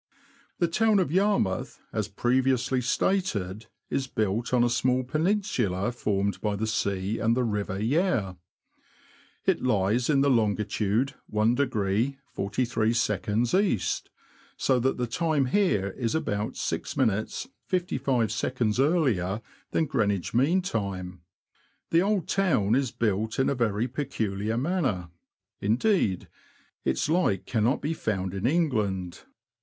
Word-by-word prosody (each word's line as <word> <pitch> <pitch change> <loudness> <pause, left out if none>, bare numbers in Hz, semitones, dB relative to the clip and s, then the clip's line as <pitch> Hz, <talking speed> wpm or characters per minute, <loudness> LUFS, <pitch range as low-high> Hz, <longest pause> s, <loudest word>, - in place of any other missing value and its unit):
The 175 - +2
town 215 +5 +3
of 180 -7 +1
Yarmouth, 190 - +1
as - - -1
previously 130 0 +1
stated, 115 - -1 0.2
is 135 -1 -1
built 110 0 -1
on 125 -1 +4
a - - +4
small 130 +1 +2
peninsula 130 - 0
formed 100 -4 -1
by 105 -1 0
the 105 +2 -2
sea 100 -2 -1
and 115 +2 +2
the 130 - +2
river 105 -4 -2
Yare. 120 - +1 1.1
It - - +2
lies 110 +1 +1
in 140 -2 +4
longitude 110 -1 +1 0.2
i° 110 +1 +1 0.2
43" 115 - +1
E., 190 - +1 0.8
so 130 -2 +2
that 130 +2 0
the 125 - 0
time 150 +3 +1
here 125 - +2
is 115 +4 -2
about 105 -9 -2
6 - - -3
minutes 110 - 0 0.2
55 135 - 0
seconds 120 -3 -1
earlier 130 - +2 0.3
than 160 - +1
Greenwich 105 - 0
mean 155 +10 +3
time. 95 - -4 0.7
The 165 - +5
old 200 -2 0
town 160 - +2
is 130 0 +2
built 110 -1 -1
in 130 - +2
a - - +2
very 115 -2 0
peculiar 110 -6 -2
manner; 130 - -1 0.5
indeed, 110 - +1 0.6
its - - 0
like 150 - +1
cannot 115 +3 +1
be 155 +3 0
found 95 - -2
in 100 +4 -1
England. 105 - 0
120 Hz, 125 wpm, -27 LUFS, 105-140 Hz, 1.1 s, The